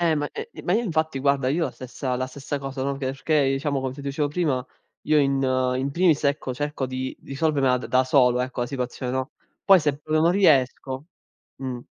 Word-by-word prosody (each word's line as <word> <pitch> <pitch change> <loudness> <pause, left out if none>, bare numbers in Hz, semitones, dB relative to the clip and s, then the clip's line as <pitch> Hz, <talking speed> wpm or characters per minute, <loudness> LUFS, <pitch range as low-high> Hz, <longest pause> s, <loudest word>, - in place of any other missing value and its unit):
Eh 165 -2 +3
ma 145 -1 -1
eh, 450 +1 -6
ma 175 - 0
io 235 - +2
infatti 160 -6 -1
guarda 140 -1 +2
io 165 +4 +1
la 130 - -2
stessa 130 +1 -4
la 130 +1 -1
stessa 140 +2 -5
cosa, 135 -1 -4
no, 140 - 0
che 135 -1 -4
perché 140 +1 +1
diciamo 135 0 -1
come 130 -1 -3
ti 140 - -9
dicevo 140 +1 -1
prima, 145 -6 0 0.4
io 155 0 +3
in 135 -1 +2 0.3
in 135 +2 -1
primis 170 -1 +3
ecco 140 -3 0
cerco 145 -1 -2
di 130 0 -4
risolvermela 140 -3 +1
d - - -6
da 130 0 +3
solo 125 -2 +4
ecco 125 -1 -3
la 120 - 0
situazione, 125 -1 -4
no, 130 0 -2 0.3
poi 195 -3 +7
se 145 -2 0
proprio 155 +1 0
non 170 - +5
riesco 135 -6 +2 0.5
mh. 130 -2 -4
140 Hz, 210 wpm, -24 LUFS, 130-150 Hz, 0.5 s, poi